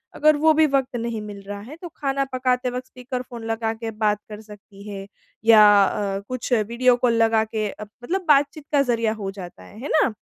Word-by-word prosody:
अगर 305 +1 +4
वो 315 +1 +4
भी 315 0 +4
वक़्त 270 -2 0
नहीं 230 -2 -3
मिल 205 -1 -8
रहा 200 +1 -7
है, 250 +9 -10
तो 345 +1 -9
खाना 275 -1 -1
पकाते 255 0 0
वक़्त 250 +1 -6
स्पीकर 250 0 -6
फ़ोन 245 -2 -10
लगा 225 0 -2
के 225 0 -6
बात 210 -1 0
कर 210 0 -8
सकती 205 -2 -14
हैं 195 -1 -7 0.4
या 220 -2 +8 0.2
अ, 195 0 -2
कुछ 255 0 -3
वीडियो 235 +3 +2
कॉल 245 -1 +2
लगा 225 -1 +3
के 215 -1 -3
अ, 210 - -8 0.2
मतलब 370 +8 -2
बातचीत 290 0 +2
का 290 -2 +4
ज़रिया 230 -4 0
हो 200 -3 -5
जाता 180 - -10
है। 205 - -14
है 285 - -5
ना? 265 -7 +2
235 Hz, 215 wpm, -23 LUFS, 210-265 Hz, 0.4 s, या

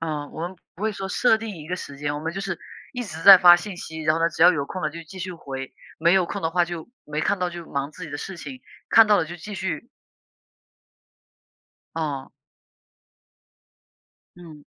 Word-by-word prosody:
嗯， 150 -3 -4
我 160 - -7
们 185 +1 -9 0.2
不 190 - -11
会 220 0 +1
说 195 -1 -5
设 220 +2 +3
定 220 -4 -6
一 155 - -10
个 180 - -2
时 140 -5 -8
间， 145 0 -2
我 145 - -4
们 160 +2 -3
就 195 - -4
是 190 -4 -4 0.3
一 245 -1 -4
直 165 -7 -8
在 195 0 +11
发 175 -1 +9
信 185 +1 -7
息， 160 0 -7
然 155 0 +3
后 165 - -2
呢， 165 - +4
只 160 0 -1
要 180 - +8
有 140 -4 -2
空 185 - -6
了 - - 0
就 165 +2 -8
继 185 +4 -11
续 185 0 -4
回， 135 -5 -7 0.3
没 170 +2 +4
有 190 -2 +4
空 - - -5
的 160 - 0
话 175 0 +3
就 170 -2 -6 0.2
没 150 +1 -3
看 200 - +1
到， 180 0 0
就 175 -1 -8
忙 140 +1 -2
自 180 +3 -9
己 155 - -9
的 145 - -5
事 190 -2 -6
情， 255 +9 -9 0.3
看 225 -1 +8
到 210 - +5
了 170 - +1
就 170 +2 -8
继 205 +5 -8
续 190 +2 -4 2.1
哦。 145 -4 -3 2.1
嗯。 160 -4 -13
170 Hz, 235 characters per minute, -24 LUFS, 155-190 Hz, 2.1 s, 在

